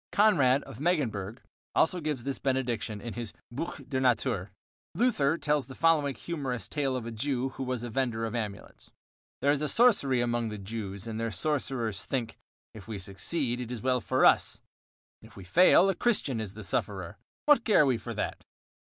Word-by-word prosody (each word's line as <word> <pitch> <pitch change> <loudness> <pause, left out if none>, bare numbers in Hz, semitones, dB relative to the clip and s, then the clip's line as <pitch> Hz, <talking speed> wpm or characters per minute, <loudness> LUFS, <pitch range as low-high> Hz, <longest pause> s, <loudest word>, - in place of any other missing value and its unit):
Konrad 145 -11 +4
of 135 -3 -11
Megenburg 120 - -1 0.3
also 180 +3 +3
gives 150 -6 -2
this 140 +1 -3
benediction 120 -5 -1
in 120 - -6
his 120 -3 -5 0.2
"Buch 140 +1 -5
der 130 -1 -1
Natur." 120 -6 +1 0.5
Luther 165 - +2
tells 150 -5 0
the 130 - -9
following 155 -4 +3
humorous 135 - -4
tale 140 -3 -1
of 125 -3 -3
a 115 - -5
Jew 130 +2 -1
who 130 - -9
was 130 -2 -2
a 120 - -4
vender 115 -2 -1
of 110 - -4
amulets: 105 -4 -6 0.5
There 140 - +5
is 150 +1 0
sorcery 200 - +4
among 120 -1 0
the 105 - -5
Jews 100 -1 -6
and 110 -1 -4
their 115 0 -1
sorcerers 120 - -1
think: 125 -5 -3 0.3
"If 110 -1 -11
we 110 -2 -4
succeed, 120 - -2
it 120 -1 -6
is 125 -2 -5
well 130 -1 +2
for - - +2
us; - - +4 0.6
if 110 -2 -16
we 95 - -9
fail, 180 - +6
a 195 - +3
Christian 175 - +1
is 100 -2 -6
the 110 - -8
sufferer; 95 -2 -3 0.3
what 295 -5 +5
care 205 -9 +5
we 130 -4 +1
for - - -6
that?" - - -3
125 Hz, 185 wpm, -29 LUFS, 110-145 Hz, 0.6 s, fail